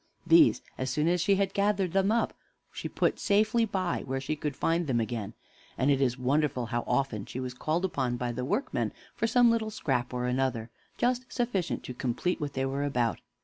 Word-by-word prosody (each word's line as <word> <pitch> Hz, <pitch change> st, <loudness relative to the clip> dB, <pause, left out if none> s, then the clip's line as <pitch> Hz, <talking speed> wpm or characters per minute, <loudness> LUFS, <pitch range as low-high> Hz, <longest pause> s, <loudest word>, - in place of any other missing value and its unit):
These, 330 Hz, -2 st, +6 dB, 0.2 s
as 130 Hz, 0 st, -1 dB
soon 150 Hz, +5 st, +1 dB
as 175 Hz, 0 st, +2 dB
she 200 Hz, +2 st, +3 dB
had 195 Hz, 0 st, 0 dB
gathered 200 Hz, -3 st, +1 dB
them 195 Hz, +1 st, +3 dB
up, 230 Hz, +1 st, +1 dB, 0.4 s
she -, -, -5 dB
put -, -, 0 dB
safely 220 Hz, +3 st, +3 dB
by, 185 Hz, -4 st, -1 dB
where 135 Hz, +1 st, -1 dB
she 140 Hz, +3 st, -2 dB
could 150 Hz, -2 st, -3 dB
find 165 Hz, +3 st, 0 dB
them 125 Hz, -3 st, +1 dB
again; 110 Hz, -1 st, -3 dB, 0.4 s
and 135 Hz, +2 st, +3 dB
it 140 Hz, -1 st, +2 dB
is 125 Hz, -2 st, +1 dB
wonderful 130 Hz, 0 st, +1 dB
how 120 Hz, +1 st, -2 dB
often 120 Hz, -7 st, 0 dB
she 130 Hz, -, -5 dB
was 130 Hz, -1 st, -4 dB
called 155 Hz, +8 st, -1 dB
upon 130 Hz, -9 st, -1 dB
by 120 Hz, 0 st, -2 dB
the 125 Hz, +1 st, -4 dB
workmen 205 Hz, -, -1 dB, 0.2 s
for 225 Hz, -, 0 dB
some 240 Hz, 0 st, +5 dB
little 225 Hz, -1 st, 0 dB
scrap 130 Hz, -, -1 dB
or 125 Hz, 0 st, -2 dB
another, 125 Hz, -2 st, -1 dB, 0.3 s
just 250 Hz, +1 st, 0 dB
sufficient 215 Hz, -8 st, -1 dB
to 125 Hz, -, -6 dB
complete 130 Hz, +9 st, -1 dB
what 145 Hz, -1 st, -3 dB
they 135 Hz, 0 st, -1 dB
were 135 Hz, +1 st, -1 dB
about. 125 Hz, -5 st, 0 dB
145 Hz, 205 wpm, -29 LUFS, 125-200 Hz, 0.4 s, These